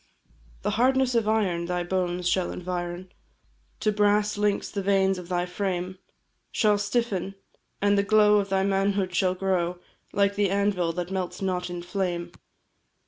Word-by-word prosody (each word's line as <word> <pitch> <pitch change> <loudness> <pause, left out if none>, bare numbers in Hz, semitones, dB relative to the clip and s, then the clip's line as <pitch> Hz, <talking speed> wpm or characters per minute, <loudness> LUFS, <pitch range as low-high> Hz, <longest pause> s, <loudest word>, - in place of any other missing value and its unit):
The - - 0
hardness 260 0 +3
of 230 -3 +1
iron 190 -6 +1
thy 180 0 -1
bones 180 -1 -1
shall 180 0 +1
environ, 180 0 -5 0.7
To 215 - +2
brass 210 0 +2
links 205 -1 0
the 200 - -2
veins 195 -1 +2
of 175 -1 -10
thy 175 -1 0
frame 185 0 -3 0.5
Shall 210 -2 +3
stiffen, 200 -3 -1 0.5
and 205 0 +4
the - - +5
glow 210 0 +5
of 200 0 -2
thy 190 0 +2
manhood 195 -1 +1
shall 185 0 +2
grow 180 -2 0 0.3
Like 200 0 +2
the 200 -1 +1
anvil 195 -3 +1
that 175 +1 -4
melts 185 -2 -3
not 185 -2 -2
in 175 -1 -5
flame! 175 -2 -2
190 Hz, 155 wpm, -26 LUFS, 180-205 Hz, 0.7 s, the